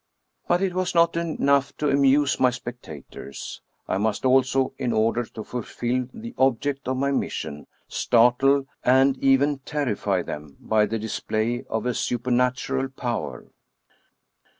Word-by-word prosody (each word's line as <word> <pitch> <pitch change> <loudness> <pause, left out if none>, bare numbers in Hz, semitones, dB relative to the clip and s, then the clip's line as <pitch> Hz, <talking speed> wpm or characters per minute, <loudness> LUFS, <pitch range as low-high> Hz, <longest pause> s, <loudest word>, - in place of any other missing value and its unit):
But 175 +2 +2
it 190 -2 0
was 185 -1 -1
not 170 0 +4
enough 140 -4 +1
to 150 - 0
amuse 140 0 +3
my 130 - +5
spectators; 120 - -8 0.3
I - - 0
must 110 +3 -1
also, 130 0 +3
in 125 -3 -1
order 115 +2 +1
to 110 0 -8
fulfill 125 +1 -3
the 235 +2 -9
object 135 +1 +1
of 130 0 0
my 140 +1 +1
mission, 75 - -3 0.2
startle 125 +4 +3 0.2
and 130 +2 +4
even 135 +1 +3
terrify 105 -10 -1
them 75 -2 -8
by 110 -1 +2
the 115 - -2
display 110 +2 -2
of 110 +1 -2
a 125 - +1
supernatural 125 +3 0
power. 125 -3 -5
130 Hz, 135 wpm, -24 LUFS, 115-140 Hz, 0.3 s, my